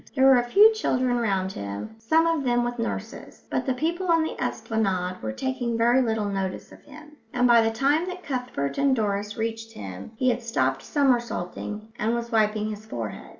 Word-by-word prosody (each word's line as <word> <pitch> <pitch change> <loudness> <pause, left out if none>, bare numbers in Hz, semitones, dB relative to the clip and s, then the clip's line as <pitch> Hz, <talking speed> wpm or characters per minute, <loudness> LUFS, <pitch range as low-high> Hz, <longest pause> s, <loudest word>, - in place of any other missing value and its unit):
There 265 -1 +4
were 265 -2 +7
a 240 0 -3
few 425 - +7
children 255 - 0
round 195 -4 0
him, 100 - -6
some 315 +9 +3
of 330 -3 +1
them 240 -1 +2
with 240 0 -3
nurses, 230 - -5
but - - -1
the 260 - +1
people 340 +7 -1
on 330 -1 +4
the 315 - -3
esplanade 185 -5 -1
were 110 - -3
taking 245 - -2
very 240 +3 +4
little 220 -3 0
notice 195 -2 -3
of - - -14
him; 300 +1 -14 0.2
and 245 0 +3
by 235 -1 +6
the 225 - +2
time 280 +9 +1
that 365 0 -6
Cuthbert 250 - -3
and 275 -1 +3
Doris 205 -2 -2
reached 225 0 -4
him, 95 - -8
he 255 +3 +2
had 240 +1 -3
stopped 135 - 0
somersaulting 230 - -1
and 225 +2 +1
was 235 0 -4
wiping 215 -1 +1
his 210 0 -7
forehead. 115 - -6
230 Hz, 195 wpm, -25 LUFS, 210-265 Hz, 0.2 s, were